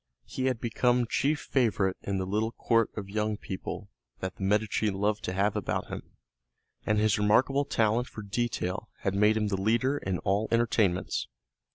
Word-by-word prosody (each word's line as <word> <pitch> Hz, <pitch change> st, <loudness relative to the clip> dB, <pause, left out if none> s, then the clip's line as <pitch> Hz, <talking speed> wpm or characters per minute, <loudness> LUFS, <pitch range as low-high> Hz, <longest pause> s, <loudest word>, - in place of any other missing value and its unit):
He 130 Hz, -, -3 dB
had 130 Hz, -3 st, +1 dB
become 120 Hz, +1 st, +2 dB
chief 145 Hz, +6 st, +1 dB
favorite 105 Hz, -7 st, +1 dB
in 100 Hz, -1 st, -2 dB
the 95 Hz, -, -1 dB
little 105 Hz, +4 st, 0 dB
court 115 Hz, -2 st, +2 dB
of 100 Hz, -2 st, -4 dB
young 105 Hz, +1 st, -1 dB
people 100 Hz, +1 st, -6 dB, 0.3 s
that 95 Hz, 0 st, -4 dB
the -, -, -12 dB
Medici 105 Hz, +2 st, +1 dB
loved 105 Hz, +2 st, 0 dB
to 90 Hz, -, -2 dB
have 100 Hz, +2 st, +1 dB
about -, -, -2 dB
him, -, -, -8 dB, 0.7 s
and 105 Hz, -, +3 dB
his 110 Hz, 0 st, +3 dB
remarkable 130 Hz, +7 st, +3 dB
talent 115 Hz, 0 st, +1 dB
for 105 Hz, -, -8 dB
detail 105 Hz, -1 st, -2 dB
had 100 Hz, -, 0 dB
made 105 Hz, +2 st, +4 dB
him 105 Hz, -1 st, 0 dB
the 95 Hz, -1 st, -1 dB
leader 120 Hz, +7 st, +2 dB
in 95 Hz, -1 st, -2 dB
all 100 Hz, +5 st, 0 dB
entertainments. 110 Hz, -6 st, +1 dB
105 Hz, 175 wpm, -29 LUFS, 100-115 Hz, 0.7 s, made